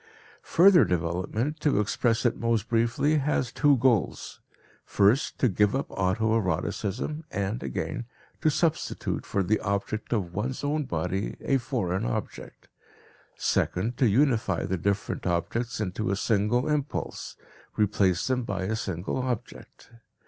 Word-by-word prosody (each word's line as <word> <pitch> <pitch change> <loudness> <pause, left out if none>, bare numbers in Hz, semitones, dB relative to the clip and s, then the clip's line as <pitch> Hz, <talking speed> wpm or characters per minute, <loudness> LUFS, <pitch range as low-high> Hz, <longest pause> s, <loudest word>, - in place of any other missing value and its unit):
Further 175 -3 +8
development, 90 - -1
to 150 -8 +2
express 115 +3 +1
it 120 - +3
most 115 -2 0
briefly, 120 +7 +2
has 135 -4 0
two 145 -2 +4
goals 120 - 0 0.4
first, 105 +8 +2
to 130 - +3
give 105 +1 +2
up 135 - -1
auto 105 +4 +1
eroticism, 100 - -2
and, 100 +4 -2
again, 120 - -4 0.4
to 155 - +4
substitute 155 +2 -1
for 100 - 0
the 105 +4 +1
object 100 +2 -3
of 95 -7 -1
one's 125 +8 -3
own 150 +1 0
body 90 +2 -2
a 135 - +1
foreign 115 -8 -2
object; - - -5 0.7
second, 110 +7 0
to 130 - +4
unify 115 - +2
the 95 - -1
different 100 +2 -2
objects 110 +8 -1
into 105 0 -2
a 100 - +1
single 110 +5 +1
impulse, 150 -2 -3 0.4
replace 100 -4 +2
them 130 -1 +1
by 115 -6 -3
a 105 +4 -1
single 95 -4 -3
object. 125 -2 -5
110 Hz, 135 wpm, -27 LUFS, 95-130 Hz, 0.7 s, Further